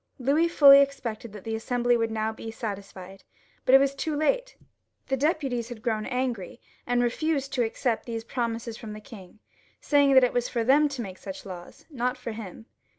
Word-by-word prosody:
Louis 285 +6 +2
ftdly 280 -4 +8
expected 245 -5 -3
that 210 -3 -10
the 225 - -4
Assembly 245 +2 +1
would 225 -1 0
now 220 0 -1
be 225 - -8
satisfied, 195 -4 -7 0.4
but 260 - +6
it - - +11
was 275 0 +2
too 300 +2 -3
late; - - 0 0.5
the 270 - +2
deputies 270 -5 -1
had 235 -2 -9
grown 220 -3 -1
angry, 250 -5 -3 0.3
and 245 0 +2
refused 275 +3 -1
to 250 - +2
accept 230 +1 -2
these 230 -1 -4
promises 230 -1 -3
from 215 -2 -8
the 215 - -8
king, 205 -3 -13 0.4
saying 285 -2 +3
that 260 - +8
it 250 - +2
was 245 0 0
for 235 - -1
them 290 +5 +4
to 270 -4 -5
make 190 -2 -9
such 190 +1 -8
laws, 180 -2 -10
not 250 -1 -1
for 250 -2 -6
him. 220 -1 -9
240 Hz, 195 wpm, -26 LUFS, 220-275 Hz, 0.5 s, it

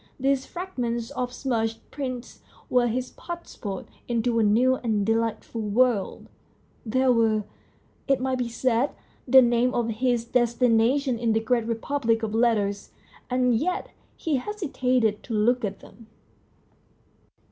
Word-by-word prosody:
These 270 0 +1
frag 365 -4 -7
ments 235 0 -2
of 250 -3 -3
smudged 225 -4 -2
prints 255 -4 -6 0.3
were 245 -1 +4
his 250 +2 -2
passport 340 - -7 0.2
into 235 0 +1
a - - +4
new 245 +5 +3
and 215 -5 0
delightful 225 +1 -1
world; 220 0 +1 0.6
they 255 +4 +1
were, 225 -3 +3 0.6
it 275 -2 +3
might 260 0 -1
be 245 -1 -1
said, 245 +3 0 0.3
the 260 +1 +8
name 240 +1 +2
of 235 -1 0
his 235 +1 0
destination 240 +2 +2
in 230 -2 +1
the 220 - +2
great 230 +1 0
republic 230 0 0
of 215 -1 -2
letters, 215 -4 +1 0.4
and 250 -1 +2
yet 360 +10 -1 0.3
he 310 -4 0
hesitated 255 - 0
to 225 - -5
look 240 +4 +2
at 200 -2 -3
them. 220 +2 -16
240 Hz, 135 wpm, -25 LUFS, 225-255 Hz, 0.6 s, the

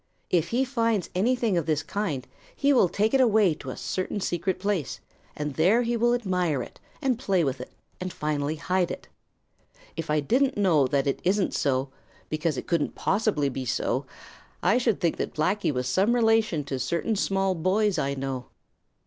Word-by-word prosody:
If 170 -2 +2
he 255 +3 +1
finds 230 -7 0
anything 225 0 +1
of 165 - -5
this 155 -2 +1
kind, 155 -11 -3 0.3
he 285 0 +3
will 215 -9 +4
take 210 +6 0
it 270 - +5
away 215 -7 +4
to 140 -3 -9
a - - -6
certain 185 +2 -3
secret 185 0 -1
place, 190 - -2 0.4
and 150 -1 -3
there 190 - +3
he 235 0 0
will 240 +1 +3
admire 180 - 0
it - - -13 0.2
and 255 -4 +1
play 190 -8 +1
with 135 -3 -2
it 125 - -9 0.3
and 185 0 -4
finally 150 -1 -2
hide 180 +2 0
it. - - -7 0.9
If 165 -1 -5
I 150 0 +2
didn't 255 - +1
know 165 -9 +3
that 140 0 +1
it 140 - -1
isn't 195 +1 +1
so, 135 -1 0 0.4
because 155 -2 -1
it - - -4
couldn't 170 -4 0
possibly 195 -8 +1
be 135 0 -3
so, 125 - -1 0.6
I 245 - +4
should 230 -5 +1
think 170 - 0
that - - -4
Blacky 185 +4 +1
was 125 -2 -2
some 195 - +2
relation 225 -9 +2
to 135 -2 -4
certain 170 - -1
small 195 -1 +1
boys 190 +4 +1
I 140 0 -1
know. 135 -2 -4
180 Hz, 185 wpm, -26 LUFS, 150-215 Hz, 0.9 s, it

